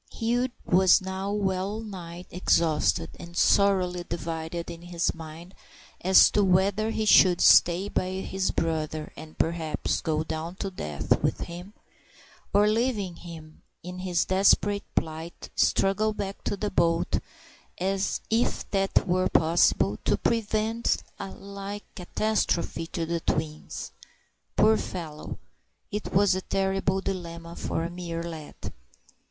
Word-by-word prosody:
Hugh 240 +2 0 0.2
was 185 0 +5
now 190 +1 -4
well 200 0 -1
nigh 180 -5 -8
exhausted, 165 -2 +1
and 170 0 -9
sorely 185 -3 +3
divided 165 +1 -4
in 170 0 -9
his 175 -1 -1
mind 165 +3 -10 0.5
as 190 +2 +7
to 205 - +3
whether 195 +3 +2
he 220 -1 -1
should 185 -4 +6
stay 175 +3 +6
by 185 -2 -1
his 190 0 -1
brother 155 -1 -2
and, 155 0 -11
perhaps, 165 -1 -1
go 155 -1 0
down 160 +2 -5
to 195 0 -4
death 75 - -1
with - - 0
him, 175 +4 -8 0.8
or, 205 +1 +4
leaving 215 -5 0
him 160 -3 -11 0.2
in 180 +1 -7
his 180 -2 0
desperate 200 +1 +3
plight, 160 +2 -4
struggle 215 +3 +2
back 200 -1 -5
to 205 - -1
the 205 +1 -2
boat, 165 0 +2 0.6
if 195 +4 -1
that 195 0 +1
were 185 +1 +2
possible, 165 +2 +3
to - - +2
prevent 225 0 0 0.2
a 195 - -5
like 200 +1 -8
catastrophe 180 -4 -1
to 165 - -3
the 170 +1 -1
twins. 155 -1 -3 0.6
Poor 220 +1 +5
fellow! 160 -4 -6 0.5
it 210 +1 -4
was 200 +1 +4
a 185 - -1
terrible 190 0 0
dilemma 170 -3 -5
for 165 - -2
a 170 - -2
mere 170 -1 -5
lad. 160 -3 -8
185 Hz, 130 wpm, -27 LUFS, 165-200 Hz, 0.8 s, as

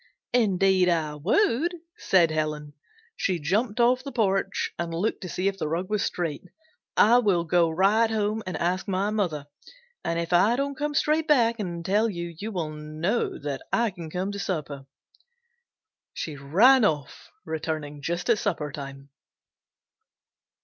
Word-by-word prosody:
"Indeed 190 -5 +3
I 160 -3 0
would!" 285 - +1 0.2
said 170 -4 +3
Helen. 150 -1 -2 0.4
She 185 -2 0
jumped 205 - 0
off 250 +2 +3
the 275 - -6
porch 195 -4 0
and 170 -1 -2
looked 180 +7 -1
to 180 - -6
see 185 +3 -1
if 195 0 -2
the - - -1
rug 175 +5 -3
was 210 -2 +1
straight. 165 -5 -2 0.5
"I 235 +4 +6
will 195 -7 +2
go 170 0 +3
right 200 +7 +3
home 215 0 -1
and 180 -3 -3
ask 180 +2 -1
my 195 +2 0
mother 175 -9 -1 0.6
and 170 - -1
if 170 +1 -2
I 205 +7 +5
don't 280 +2 -1
come 295 +1 -3
straight 310 +2 +2
back 235 -6 +3
and 170 -4 -4
tell 210 +4 +2
you, 170 -3 -5
you 215 +2 -4
will 170 -6 -3
know 155 +8 -2
that 140 -2 -4
I 235 -2 +2
can 170 -4 -8
come 185 +4 -3
to 200 - -6
supper." 150 -7 -4 1.3
She 155 - -4
ran 205 - +5
off, 150 -8 -1 0.2
returning 155 -2 -4
just 170 +4 -3
at 235 -3 +3
supper 155 -7 -2
time. 140 -1 -9
185 Hz, 160 wpm, -26 LUFS, 160-220 Hz, 1.3 s, I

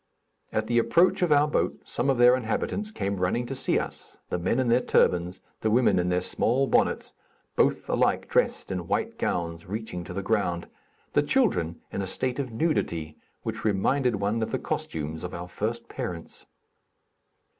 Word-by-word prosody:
At 110 - 0
the 120 +1 +2
approach 170 +11 +3
of 175 -3 +2
our 145 0 +5
boat, 150 - 0
some 135 - 0
of 135 - +3
their 120 +1 +7
inhabitants 130 - -2
came 100 - -3
running 90 +7 0
to 120 - -4
see 130 - +1
us; - - -5
the 90 - 0
men 115 +8 +1
in 130 - +1
their 120 +2 +4
turbans, 90 -6 +2 0.2
the 110 - 0
women 120 -3 +4
in 90 0 0
their 90 0 +1
small 125 +8 +2
bonnets, - - +1 0.4
both - - +2
alike - - +1
dressed - - +1
in 90 -3 -3
white - - -1
gowns 85 -1 -2
reaching 105 -3 -4
to 90 - -7
the 100 +2 -3
ground, 90 -5 0 0.5
the - - +4
children 145 - +1
in 100 - -2
a 95 - -3
state 125 +7 -1
of 130 -3 -3
nudity 85 - -1 0.3
which 110 0 -4
reminded 120 +5 +2
one 100 +3 -1
of 110 - -1
the - - -1
costumes 80 +1 -4
of 90 - -5
our 85 +1 -6
first 115 +5 -3
parents. 85 -2 -6
110 Hz, 180 wpm, -27 LUFS, 90-125 Hz, 0.5 s, their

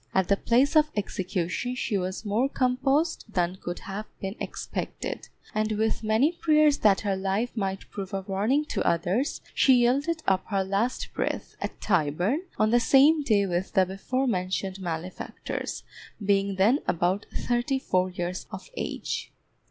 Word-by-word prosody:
At 190 -2 +2
the 200 - +5
place 250 +9 +2
of 305 -1 +5
execution 190 +3 -2
she 235 -4 -2
was 185 +2 -2
more 220 +6 +1
composed 270 +6 +1
than 180 -1 0
could 175 0 -4
have 205 +2 -6
been 195 +1 -4
expected, - - -5 0.2
and 215 0 0
with 220 +1 0
many 220 +8 +3
prayers 305 -3 +3
that 200 -3 +4
her 200 -3 0
life 195 +6 -1
might 195 -3 -3
prove 195 -2 -6
a 195 - -2
warning 210 +10 +1
to - - -1
others, 180 - 0
she 265 - +5
yielded 280 +7 +2
up 190 -1 +2
her 195 -2 0
last 200 +6 -1
breath, - - -3
at - - -4
Tyburn, 180 - +1 0.2
on 215 0 +3
the 240 - +5
same 280 +6 +5
day 215 -7 +3
with 180 0 -2
the 190 -3 +5
before 195 +8 -2
mentioned 190 -3 -1
malefactors, 175 0 -5 0.4
being 200 0 +2
then 215 +9 +4
about 180 +4 0
thirty 245 +2 0
four 185 -8 +1
years 180 0 -4
of - - -9
age. - - -4
205 Hz, 160 wpm, -27 LUFS, 190-255 Hz, 0.4 s, the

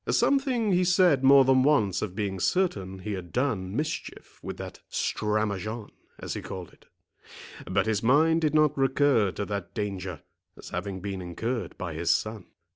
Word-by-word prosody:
Something 260 -6 +2
he 180 0 +3
said 180 -6 +4
more 135 0 +7
than 130 0 +4
once 130 -9 +2
of 95 -4 -4
being 100 -3 -2
certain 95 - 0
he 105 +3 -5
had 90 -3 -7
done 110 -8 -1
mischief 150 +3 -5
with - - -6
that - - -8
stramaçon, 105 0 -2 0.3
as - - -5
he - - -5
called 95 -3 -8
it; - - -24 0.8
but 95 +1 +1
his 110 -2 0
mind 160 +7 +4
did 155 -1 +1
not 150 -1 +4
recur 135 -5 +3
to 100 - -3
that 100 -3 -5
danger, 95 - -4 0.4
as - - -10
having 95 +1 -4
been 100 -2 -4
incurred 105 +4 -4
by 85 -3 -5
his 80 +2 -2
son. 110 -3 0
110 Hz, 170 wpm, -27 LUFS, 95-145 Hz, 0.8 s, more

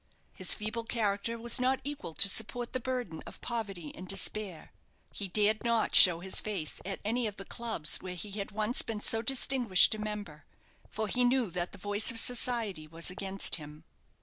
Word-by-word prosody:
His - - +1
feeble 220 +2 -4
character 225 0 -2
was 235 +2 +3
not 260 +1 +1
equal 285 - -6
to - - +4
support 225 +4 -2
the 255 - -1
burden 245 -10 -4
of - - -10
poverty 200 -10 -5
and 185 - -10
despair. 195 -3 -2 0.4
He 200 - -4
dared 210 +3 +2
not 235 -1 0
show 170 -2 +8
his 190 +1 +1
face 195 -8 -4
at 195 0 -5
any 235 +2 0
of 205 - -6
the 195 - -9
clubs 225 -10 -1
where 185 -1 -7
he 200 +4 -6
had 200 0 -4
once 215 +3 0
been 220 -2 -5
so 225 +1 +3
distinguished 245 -6 +4
a 215 - -6
member; 205 -8 -7 0.4
for 220 0 -3
he 250 +4 +1
knew 245 -5 +1
that 175 0 -3
the - - -10
voice 205 +2 +2
of 230 - -1
society 225 -9 0
was 165 +3 -2
against 195 0 +1
him. 150 0 -11
210 Hz, 190 wpm, -30 LUFS, 185-235 Hz, 0.4 s, show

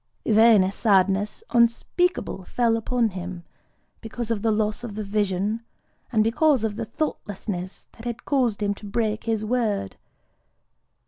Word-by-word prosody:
Then 220 -2 +6
a 185 - 0
sadness 200 - +2
unspeakable 235 - +1
fell 235 +1 +1
upon 230 0 0
him, 180 -2 -7 0.6
because 230 0 -5
of 215 -3 -1
the 225 0 +2
loss 215 +1 0
of 220 -4 -6
the 215 - -3
vision, 205 +1 -1 0.5
and 220 -3 +3
because 255 +3 +3
of 215 -2 -1
the 230 +1 -3
thoughtlessness 205 - -4
that 225 - -14
had 240 0 -5
caused 245 -7 +1
him 205 0 +1
to 205 +1 -11
break 215 +1 -1
his 220 -2 -1
word. 215 - -1
220 Hz, 145 wpm, -24 LUFS, 200-235 Hz, 0.6 s, Then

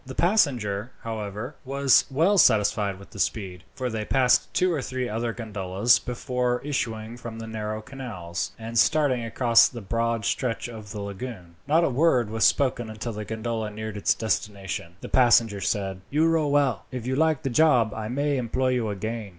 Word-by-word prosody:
The 130 -1 -9
passenger, 125 - +1
however, 110 +3 -5
was 135 0 +3
well 165 +9 +3
satisfied 105 - +3
with 100 - -15
the 100 - -10
speed, 95 -4 -2
for 130 - -2
they 110 -3 -3
passed 125 +2 +2
two 180 -1 +2
or 150 - -1
three 130 -1 -3
other 115 +2 -2
gondolas 105 -1 +1
before 125 0 -2
issuing 115 -5 -3
from 115 -2 -8
the 115 - -6
narrow 110 -1 -4
canals, 105 -11 -5
and 115 +1 -2
starting 140 -4 +3
across 115 0 +4
the 120 - -8
broad 115 +1 -1
stretch 125 -4 -1
of 110 -3 -9
the 105 +1 -6
lagoon. 100 -3 -7
Not 160 +3 +4
a - - +2
word 125 -5 +2
was 110 0 +2
spoken 125 -4 +2
until 110 +2 -5
the 105 0 -6
gondola 110 0 -3
neared 110 0 -6
its 105 - +1
destination. 100 -5 -3
Then - - -29
the - - -7
passenger 115 -5 +4
said: 95 -1 -2
"You 155 +3 +2
row 165 -2 +2
well. 140 -5 +1
If 125 -3 -5
you 130 +1 -1
like 160 0 +2
the 135 - -1
job 125 -6 +4
I 110 -1 -5
may 140 +4 0
employ 130 +1 0
you 125 -4 0
again." 110 +1 -4
115 Hz, 185 wpm, -25 LUFS, 105-130 Hz, -, across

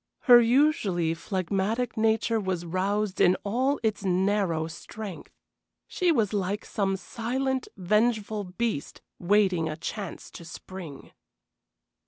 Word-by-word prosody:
Her 245 -2 +8
usually 230 - +2
phlegmatic 195 +7 -2
nature 225 0 +2
was 185 -4 -2
roused 195 +3 -1
in 180 - +5
all 255 +7 0
its 215 -2 0
narrow 190 -3 +1
strength. 190 +4 -8 0.6
She 360 -2 +1
was 220 -9 +1
like 200 +1 -2
some 195 -2 -1
silent, 255 +6 -2
vengeful 210 +2 +1
beast 180 -4 -3 0.2
waiting 185 -3 +2
a 155 - -5
chance 195 +2 -6
to - - -10
spring. 170 -2 -9
205 Hz, 115 wpm, -27 LUFS, 185-225 Hz, 0.6 s, Her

